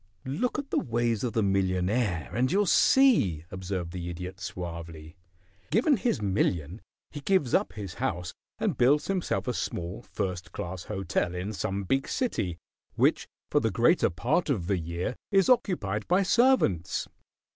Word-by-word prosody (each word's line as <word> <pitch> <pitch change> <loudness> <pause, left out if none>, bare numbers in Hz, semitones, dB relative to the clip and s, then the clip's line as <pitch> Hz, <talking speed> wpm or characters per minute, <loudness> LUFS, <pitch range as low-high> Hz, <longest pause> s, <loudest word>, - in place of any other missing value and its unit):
"Look 220 - -1
at 285 -2 -5
the - - +2
ways 115 -2 0
of 120 - -1
the 110 - +1
millionaire 95 -1 0
and 125 +4 +1
you'll 205 +3 +3
see," 175 - +4
observed 95 -2 -4
the 90 -1 -5
Idiot, 90 +2 -6
suavely. 85 -3 -7 0.5
"Given 240 - +3
his 195 - -1
million 95 -2 0 0.3
he 150 - -6
gives 150 -7 +1
up - - +2
his 100 -5 -6
house 90 -9 -3 0.2
and - - -1
builds 145 +5 +4
himself 185 -8 -1
a 125 - 0
small, 90 -1 -4
first 95 -6 -4
class 90 0 -5
hotel 95 -3 -2
in 95 +4 -3
some 100 0 -2
big 135 +8 0
city, 95 - -1 0.4
which - - +2 0.2
for - - +4
the - - +1
greater - - +3
part 125 - 0
of 105 -12 0
the 95 0 0
year 85 +7 -3 0.2
is 195 +1 +4
occupied 170 - +1
by 180 +3 +3
servants. 195 - +2
100 Hz, 155 wpm, -28 LUFS, 90-145 Hz, 0.5 s, see